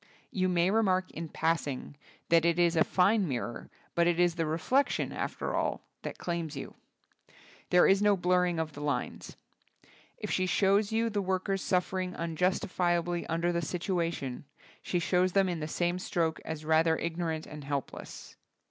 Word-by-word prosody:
You 185 -1 +1
may 180 +1 +2
remark 190 -4 +2
in 165 0 -6
passing 155 -4 -1 0.3
that 165 -1 +5
it 170 0 +2
is 175 -1 +3
a 160 - +5
fine 195 +1 +3
mirror, 120 -4 -4 0.2
but 170 0 +3
it 175 0 +2
is 175 -1 +4
the 165 -2 -1
reflection, 210 - +1
after - - -3
all, - - -1 0.2
that - - -6
claims 170 -4 -3
you. - - -7 1.0
There 180 - +6
is 195 +1 +4
no 205 -1 +4
blurring 180 -1 +2
of 160 -1 -2
the 145 - -8
lines. 145 -4 -3 0.8
If - - -5
she 185 - +1
shows 200 +3 +3
you 225 +1 +1
the 205 -1 0
workers 190 +1 -1
suffering 185 0 0
unjustifi 175 +1 0
ably 175 0 -2
under 170 +2 0
the 170 0 0
situation, 170 -6 -2 0.4
she 180 - -1
shows 180 +1 +2
them 195 -1 +4
in 175 -2 -2
the 155 - -3
same 175 +3 -1
stroke 165 -3 -1
as 155 -1 -6
rather 160 +1 +3
ig 170 0 -3
norant 160 -2 -2
and 150 -1 -9
helpless. 140 -1 -6
175 Hz, 170 wpm, -30 LUFS, 160-185 Hz, 1.0 s, There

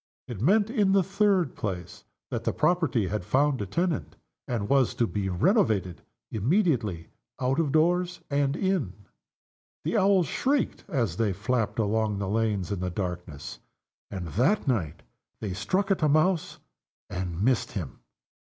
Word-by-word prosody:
It 115 -6 -6
meant, 205 - +3
in 205 -6 +2
the 195 -1 +4
third 195 - +1
place, 90 -4 -5 0.3
that - - -2
the - - 0
property 150 - +1
had 105 -1 -2
found 130 +6 +2
a 100 - -3
tenant, 170 - -1 0.3
and 115 -5 -2
was 135 -1 +3
to 120 - +2
be 100 -3 -2
renovated 105 - +1 0.3
immediately 115 - 0 0.3
out 130 +4 +1
of 155 -4 +1
doors 175 +3 +2
and 140 0 +1
in. 185 - 0 0.9
The 165 +8 0
Owls 195 -2 +4
shrieked 270 - -1
as 120 - -1
they 110 -4 +1
flapped 110 +4 -1
along 110 -1 +1
the 100 -1 -2
lanes 105 -2 0
in 100 - -2
the 90 0 -2
darkness, 90 -8 -5 0.5
And 90 -4 -5
that 135 - +1
night 100 - -1 0.4
they 100 -4 -4
struck 190 - 0
at 195 - +1
a 155 - +3
mouse 155 +3 +2 0.5
and 90 0 -3
missed 125 0 +1
him. 80 - -5
120 Hz, 150 wpm, -27 LUFS, -, 0.9 s, the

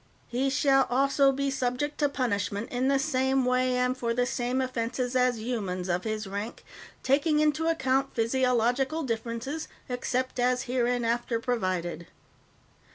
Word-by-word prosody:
"He 260 +3 0
shall 270 -1 +3
also 275 +2 +3
be 275 +1 -1
subject 265 +3 -2
to 290 -2 +3
punishment 205 -5 -2
in 255 +1 0
the 275 0 +3
same 265 -2 +1
way 255 0 +2
and 250 0 +1
for 235 -2 -2
the 245 0 +2
same 250 +1 -1
offenses 250 0 -2
as 250 -2 +2
humans 195 -6 -3
of 175 +3 -1
his 215 0 -2
rank, 200 +4 -6 0.4
taking 300 +3 +2
into 305 +1 +2
account 270 -4 +1
physiological 250 +5 +1
differences, 235 +5 -3 0.2
except 250 +1 -2
as 250 +1 +2
hereinafter 240 -1 0
provided. 185 -9 -2
250 Hz, 140 wpm, -28 LUFS, 230-270 Hz, 0.4 s, shall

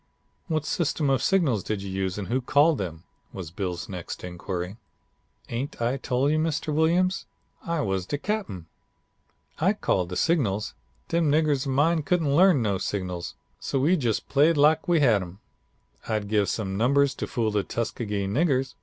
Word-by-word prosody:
"'What 155 -3 -1
system 150 -4 0
of 135 - +2
signals 155 - +2
did 100 +1 -3
you 100 - -5
use 95 0 -2
and 100 -3 -4
who 130 +6 0
called 145 +3 +3
them?' 85 -3 -5 0.3
was 85 -4 -7
Bill's 90 -1 -4
next 90 -3 -7
inquiry. 90 +2 -5 0.7
"'Ain't 125 +4 -4
I 120 +3 0
tole 130 0 0
you, 155 +1 +2
Mr. 155 -1 -1
Williams, 175 +5 +2 0.4
I 170 -3 -1
was 95 -6 -2
de 145 - -2
cap'en. 190 - -3 0.9
I - - +3
called 90 -2 0
the 90 - -5
signals. 110 - +1 0.4
Dem 165 -3 +2
niggers 150 -3 +2
of 135 - -1
mine 160 +4 +3
couldn't 155 -2 +1
learn 175 -6 +5
no 100 -3 0
signals, 90 -3 -4 0.2
so 135 - -2
we 155 +8 +3
jus' 120 - 0
played 150 +3 +2
lack 155 +4 +4
we 170 -3 +3
had 115 -8 +4
some. 90 +2 -9 0.7
I'd 105 -2 -1
give 105 -1 +1
some 95 -3 -2
numbers 140 +5 +3
to - - -5
fool 115 -3 -1
the 105 -1 +1
Tuskegee 105 -2 -3
niggers. 135 - +1
130 Hz, 170 wpm, -26 LUFS, 100-155 Hz, 0.9 s, learn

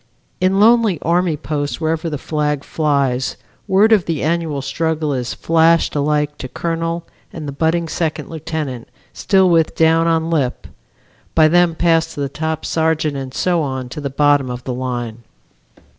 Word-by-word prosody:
In 185 +2 +2
lonely 225 -3 +4
army 170 -1 +1
posts 145 -1 -3
wherever 160 +1 -1
the 150 - -3
flag 150 -1 -2
flies 140 -5 0 0.3
word 205 +4 +4
of 200 -5 +3
the 165 -3 -2
annual 155 -3 -1
struggle 160 0 -1
is 125 -2 -3
flashed 165 0 +2
alike 150 0 0
to 130 - -5
colonel 165 +3 -3 0.3
and 155 -3 -7
the - - -3
budding 165 +4 0
second 160 0 -2
lieutenant 155 -6 -5 0.3
still 190 -2 +3
with 165 -2 +2
down 165 +1 +3
on 165 0 +1
lip, 140 -6 -1 0.7
by 155 -1 +6
them 175 0 +3
passed 165 -1 +1
to - - -7
the 140 -1 -1
top 160 +2 -3
sergeant 160 -2 0
and 135 -1 -6
so 175 -2 +1
on 130 -3 -4
to 150 - -7
the 140 - -3
bottom 145 -1 +2
of 125 0 -6
the 130 - -4
line. 120 -3 -4
160 Hz, 165 wpm, -18 LUFS, 140-165 Hz, 0.7 s, by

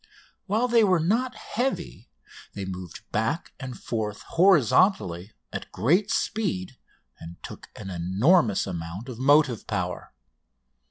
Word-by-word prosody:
While 220 +5 +1
they 235 -2 +4
were 185 -4 +4
not 235 +10 0
heavy, 230 - -4 0.5
they 100 -1 -4
moved 90 -2 -7
back 110 +10 -1
and 130 -3 -7
forth 105 -3 -4
horizontally 150 - +3 0.2
at - - -6
great 175 - +2
speed 195 - -2 0.4
and 85 +1 -9
took - - -10
an 100 -3 -7
enormous 100 - +2
amount 90 +6 -6
of 120 -2 -8
motive 140 -3 +3
power. 90 -4 -3
120 Hz, 120 wpm, -26 LUFS, -, 0.5 s, they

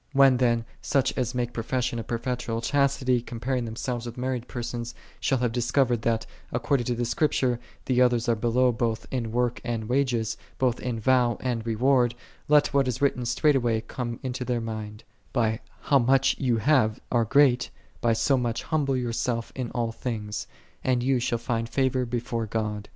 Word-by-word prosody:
When 135 -2 +6
then 120 -2 +2 0.2
such 135 -2 +1
as 125 -1 -1
make 120 -1 -1
profession 120 +1 -1
of 115 - -6
perpetual 120 -1 -2
chas 140 +2 +2
tity, 125 -2 +1
comparing 120 +1 -2
themselves 120 +1 -4
with 120 - -8
married 125 -1 -2
per 120 - -5
sons, 120 0 -5 0.2
shall 135 - +1
have 120 -2 0
discovered, 120 0 +1
that, 115 -1 0 0.3
according 135 -5 0
to 120 - 0
the 120 +1 -1
Scriptures, 125 -1 +1 0.3
the 125 -1 +2
others 120 -1 +3
are 120 - +3
below 120 +3 +2
both 115 -1 -1
in 115 -4 -2
work 120 0 0
and 115 -3 -3
wages, 120 -4 0 0.2
both 125 -2 +1
in 120 -2 -3
vow 120 0 +3
and 120 -3 -2
reward, 120 +1 +3 0.3
let 150 0 +4
what 140 -2 +3
is 125 -1 -2
written 135 -3 +1
straightway 120 -3 +2
come 120 +1 -5
into 130 -1 -3
their 125 -1 -1
mind, 110 -1 -6 0.2
" - - -35
By 110 -3 +1 0.2
how 140 -2 +4
much 130 +2 +3
thou 120 -2 +2 0.2
arl 120 -2 +3
greal, 135 +1 +5 0.4
by 115 -1 +3
so 135 +4 +2
much 120 -2 -1
humble 145 -4 0
thyself 120 -1 -2
in 125 -3 -4
all 115 -2 -1
things: 110 -3 -4 0.4
and 125 -2 +1
thou 130 0 +2
shalt 120 -1 -1
find 115 -1 -2
favor 130 0 +1
before 115 -1 -2
God." 105 -1 -3
120 Hz, 180 wpm, -26 LUFS, 115-130 Hz, 0.4 s, When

